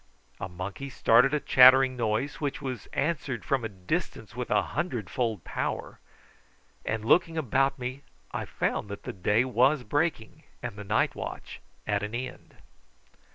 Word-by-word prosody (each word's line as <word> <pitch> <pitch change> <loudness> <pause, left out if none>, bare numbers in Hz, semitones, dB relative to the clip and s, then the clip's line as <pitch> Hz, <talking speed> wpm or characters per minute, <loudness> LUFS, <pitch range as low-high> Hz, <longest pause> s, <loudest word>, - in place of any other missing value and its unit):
A 95 - -4
monkey 95 +9 -6
started 125 0 +4
a 150 - +1
chattering 130 0 +7
noise, 115 +5 -1
which 145 -2 -2
was 130 -7 -5
answered 140 -5 -2
from 135 -4 +1
a 115 - -2
distance 95 -3 -4
with - - -4
a - - +3
hundredfold 115 - -2
power; - - -4 0.8
and 110 -1 -2
looking 165 +5 +3
about 135 0 +1
me 130 +2 -5 0.3
I - - -3
found 105 - -2
that 100 - -7
the - - -5
day 105 +6 +2
was 130 +2 +3
breaking 145 -2 -1 0.2
and - - -4
the 105 - -7
night 100 - +1
watch - - -7 0.2
at 100 -1 0
an 105 +2 -4
end. 130 +1 -6
125 Hz, 155 wpm, -28 LUFS, 105-135 Hz, 0.8 s, chattering